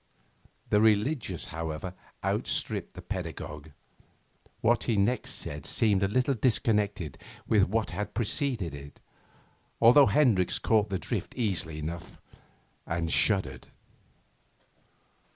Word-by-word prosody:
The 105 - +4
religious, 110 - +1
however, 80 +3 -4 0.3
outstripped - - -2
the - - -9
pedagogue. 75 0 -6 0.9
What 120 +1 +2
he 115 - +1
next 105 +5 +1
said 70 0 -4
seemed 105 -4 +3
a 100 - +3
little 130 +7 +1
disconnected 105 - 0 0.3
with 105 -3 +4
what 110 +1 -1
had 105 +4 -5
preceded 115 - -1
it, 70 0 -10 0.8
although 125 +4 +7
Hendricks 105 -5 +3
caught 110 -2 +2
the 95 - -1
drift - - -4
easily 90 -9 -1
enough 85 +3 -6 0.7
and 80 0 -1
shuddered. 100 0 +2
100 Hz, 110 wpm, -28 LUFS, 85-115 Hz, 0.9 s, although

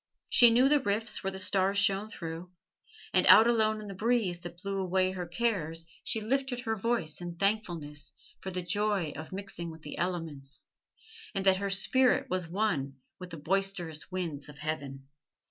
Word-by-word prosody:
She 240 -2 +8
knew 245 +3 +5
the 295 +1 +4
rifts 220 -3 0
where 195 - 0
the 190 - -7
stars 190 +1 +1
shone 200 +1 +2
through, 165 -1 -7 0.6
and - - +4
out 220 - +9
alone 220 -2 +2
in 215 - -8
the 200 - -6
breeze 210 -3 0
that 175 0 -9
blew 195 0 -2
away 185 0 +1
her 180 -2 -5
cares 170 -5 -1 0.2
she 225 - -1
lifted 255 +2 -1
her 225 -2 -1
voice 200 -8 -1
in 175 -1 -6
thankfulness 170 -7 -2 0.3
for 190 - -6
the 180 -1 -3
joy 200 -2 0
of 155 +2 -8
mixing 190 -3 -5
with 160 -1 -11
the 145 - -7
elements, 160 -6 -4 0.7
and 195 - -1
that 190 -1 +5
her 200 +1 -2
spirit 250 +6 +2
was 185 -2 -1
one 165 -8 -1 0.2
with 180 -1 -8
the 165 - -7
boisterous 180 -1 -1
winds 165 -6 -4
of 150 - -12
heaven. 140 -3 -5
190 Hz, 180 wpm, -30 LUFS, 165-215 Hz, 0.7 s, out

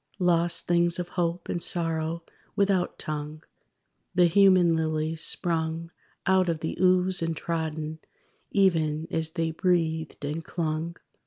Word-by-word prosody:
Lost 170 -2 +1
things 170 -1 +2
of 180 -1 -4
hope 170 0 -2
and 175 - -2
sorrow 165 -1 +2 0.3
without 195 -3 +1
tongue: 150 0 -5 0.7
The 180 -1 +5
human 180 -1 +5
lilies, 160 0 -1
sprung 165 -1 -2 0.3
Out 190 -2 +3
of 160 -2 -2
the 160 - -3
ooze, 185 0 +3
and 165 -1 -2
trodden, 160 -1 -3 0.5
Even 160 -5 +1
as 160 -1 -2
they 165 -2 -1
breathed 160 -3 -1
and 155 +3 -3
clung! 165 0 -3
165 Hz, 130 wpm, -27 LUFS, 160-175 Hz, 0.7 s, The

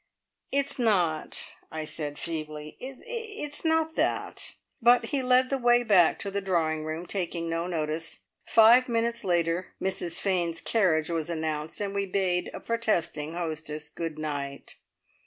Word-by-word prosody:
"It's 280 0 0
not" 180 -9 +1
I 160 0 -4
said 150 -2 -4
feebly 155 -2 -5
"it's 295 - -5
not 320 0 +2
that!" - - 0 0.3
But 240 +1 +6
he 280 - 0
led 255 +1 +3
the 275 - +1
way 240 0 +4
back 195 -7 +5
to 200 - -4
the 200 +1 -1
drawing 160 -5 0
room, 155 +2 -4
taking 175 -2 -2
no 165 +1 -1
notice. 160 -1 -2 0.2
Five 235 +3 +6
minutes 235 0 0
later 175 -1 0
"Mrs 180 -3 -1
Fane's 175 -4 0
carriage" 170 -8 +2
was 165 -1 -1
announced, 155 -1 -2
and 200 -1 -2
we 200 0 -1
bade 185 -2 0
a - - -7
protesting 175 -9 -1
hostess 155 -3 -4
good 165 0 -5
night. 140 -3 -5
175 Hz, 145 wpm, -28 LUFS, 160-230 Hz, 0.3 s, But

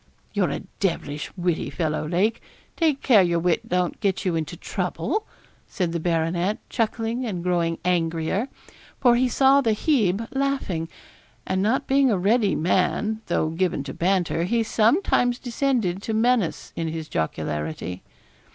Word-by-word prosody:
'You're - - +1
a - - -3 0.2
devilish 150 -6 -2
witty 175 -2 -1
fellow, 155 -2 -2
Lake; 190 +7 +1 0.3
take 310 -5 +1
care 225 -7 +6
your 170 -2 +2
wit 170 0 0
don't 180 -1 0
get 200 -2 0
you 180 -3 +1
into 160 -2 -3
trouble,' 430 0 -2 0.4
said 180 -3 -2
the 170 - -2
baronet, 170 +4 0
chuckling 230 +1 -1
and 190 -8 -3
growing 170 -2 0
angrier, 170 +6 0 0.5
for 245 -2 +5
he 250 +1 +2
saw 270 +3 +5
the 225 -5 +1
Hebe 220 - +1
laughing; 270 - -1 0.6
and 190 0 0
not 225 +7 +1
being 270 0 +3
a 210 - +2
ready 205 +3 +2
man, 190 +6 +1
though 160 -2 +1
given 170 -3 -1
to 135 -1 -6
banter, 175 -2 +1
he 230 +4 +1
sometimes 245 - +2
descended 235 -8 -1
to 220 +1 -3
menace 230 -5 +1
in 165 - -2
his 160 -1 -4
jocularity. 80 - -3
190 Hz, 150 wpm, -24 LUFS, 165-235 Hz, 0.6 s, care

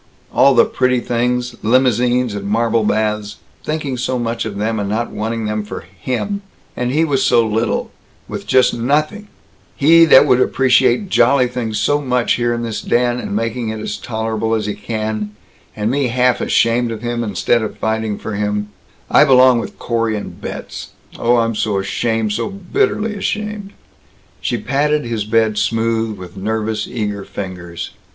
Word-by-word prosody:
All 140 -1 +5
the 120 - +6
pretty 125 -1 +1
things 125 +1 -1
limousines 125 0 +2
and 100 -1 -5
marble 115 +1 +1
baths 105 -1 -1 0.3
thinking 150 -4 -3
so 125 +1 -1
much 115 -1 -2
of 105 -2 -5
them, 110 +1 -1
and 100 -1 -2
not 115 +3 -2
wanting 115 +1 -3
them 105 0 -2
for 105 - -7
him! 125 - -4 0.3
And 125 0 -1
he 155 +4 +2
with 140 -4 +1
so 115 -3 +3
little, 110 +1 -1 0.4
with - - -7
just 130 -1 +4
nothing 150 - 0 0.5
he 165 +3 +6
that 150 - +7
would 125 0 +3
appreciate 130 - +2
jolly 125 +2 +4
things 115 -3 -3
so 145 +8 +1
much 125 -3 +1
here 120 0 0
in 120 0 -2
this 115 -2 -3
den, 120 0 +1
and 100 - -4
making 115 +1 -2
it 110 0 -4
as 110 - -4
tolerable 110 0 -2
as 110 -2 -2
he 105 - -2
can 105 0 -4 0.4
and 105 +2 -1
me 140 -1 +1
half 125 +1 +2
ashamed 115 +1 +2
of 110 0 -6
him 120 0 -2
instead 115 +3 +1
of 110 - -5
fighting 110 -1 -1
for 110 - -6
him 105 0 -2 0.4
I - - +6
belong 130 -3 +6
with - - -7
Corey 115 -2 -1
and 105 - -8
Betz. - - -7 0.3
Oh, 120 +1 +3
I'm 115 0 +1
so 105 -1 -1
ashamed, 110 +2 -1
so 115 +2 -2
bitterly 210 - -1
ashamed." 210 0 -4 0.7
She 120 - -1
patted 145 +5 0
his 115 -3 -2
bed 110 -1 +2
smooth 115 -1 0
with 90 +2 -11
nervous 110 +2 -2
eager 105 -4 -3
fingers. 90 -4 -7
115 Hz, 170 wpm, -18 LUFS, 110-125 Hz, 0.7 s, that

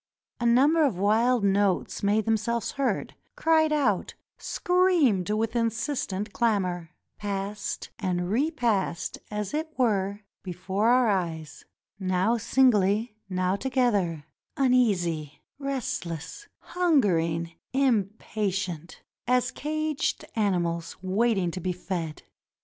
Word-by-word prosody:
A 235 - +1
num 260 +6 +5
ber 330 -1 +4
of 265 -11 +1
wild 225 +4 +3
notes 200 -1 +1
made 205 +2 +2
themselves 225 +1 0
heard, 275 -1 -1 0.2
cried 315 -1 +3
out, 260 -11 +1 0.2
screamed 345 - +2
with 220 +2 0
insistent 230 -3 -2
clamor, 185 -7 0 0.3
passed 205 0 -4
and 180 -3 -1
repassed 235 - 0
as 210 +1 -4
it 315 +1 -2
were 205 -5 +1 0.2
before 190 +4 -1
our 250 0 +4
eyes; 165 -6 -2 0.3
now 185 +4 +1
singly, 220 -2 +2
now 185 0 0
together; 205 - 0 0.3
uneasy, 190 - +1 0.2
restless, 265 - -4 0.3
hungering, 175 - +2 0.2
impatient, 200 - -1 0.2
as 250 0 +2
caged 310 0 -2
animals 175 -6 -1
waiting 195 -1 +1
to 185 - -5
be 185 - -1
fed. 175 -3 -5
210 Hz, 105 wpm, -27 LUFS, 185-250 Hz, 0.3 s, num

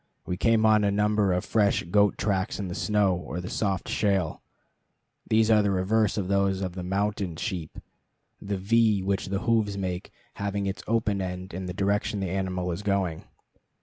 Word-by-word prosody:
We 90 - -2
came 110 +3 +3
on 110 -1 +5
a 100 - +3
number 105 -1 +2
of 90 0 0
fresh 105 -3 +2
goat 100 +3 +2
tracks 95 -2 -1
in 100 -3 -4
the - - -4
snow 105 -1 +2
or 90 0 -5
the 90 - -6
soft 95 -4 -1
shale. 95 -6 0 0.9
These 110 0 +4
are 105 -1 +6
the 100 - +1
reverse 100 +3 +1
of 95 -3 -1
those 100 -1 +1
of 90 -2 -3
the 90 - -6
mountain 100 -1 -1
sheep, 85 -3 -5 0.6
the 100 0 -3
V 105 0 +2
which 95 0 -1
the 100 +1 -2
hoofs 110 -4 +1
make 90 -1 -4 0.3
having 100 0 -1
its 95 +1 -3
open 105 -3 +1
end 90 0 -5
in 95 +1 -5
the 90 - -4
direction 100 +1 0
the 95 -2 -2
animal 90 -2 -2
is 85 +3 -4
going. 100 -5 -1
100 Hz, 185 wpm, -27 LUFS, 95-105 Hz, 0.9 s, are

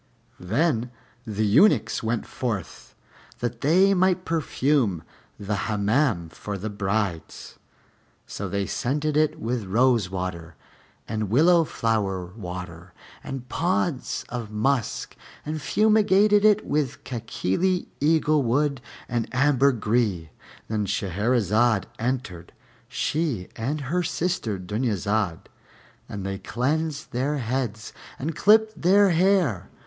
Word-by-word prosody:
Then 120 - 0 0.4
the 110 0 -1
eunuchs 130 - +4
went 115 +1 -2
forth 110 -8 -5 0.4
that 120 -1 -4
they 185 +7 +4
might 185 -1 +2
perfume 140 - 0 0.4
the 105 +1 -3
Hammam 105 - +1
for 100 +4 -6
the 105 +3 -5
brides; 100 -4 -3 0.7
so 100 -1 -5
they 100 +1 -1
scented 145 +8 -1
it 155 0 +2
with 115 -1 -2
rosewater 95 -7 0 0.5
and 110 -2 -2
willow 165 - +5
flower 105 - -1
water 90 -3 -8 0.3
and 135 -2 -6
pods 170 -1 -1
of 120 -3 -5
musk, 115 +3 -1 0.3
and 155 +1 -4
fumigated 210 +3 +4
it 215 -1 +4
with 145 -4 -1
Kákilí 130 - -1
eaglewood 145 -3 +2 0.3
and 120 -2 -1
ambergris. 120 - +2 0.4
Then 105 -2 -1
Shahrazad 105 +3 +1 0.2
entered, 115 -8 -3 0.3
she 145 - -2
and 140 +7 -3
her 160 +7 -1
sister 170 - -2
Dunyazad, 105 -2 -1 0.7
and 100 -1 -5
they 95 0 -3
cleansed 150 +8 -2
their 135 +5 -1
heads 120 -3 -3 0.2
and 150 +3 -4
clipped 215 +3 +4
their 195 +2 +5
hair. 170 - +2
120 Hz, 105 wpm, -25 LUFS, 100-155 Hz, 0.7 s, willow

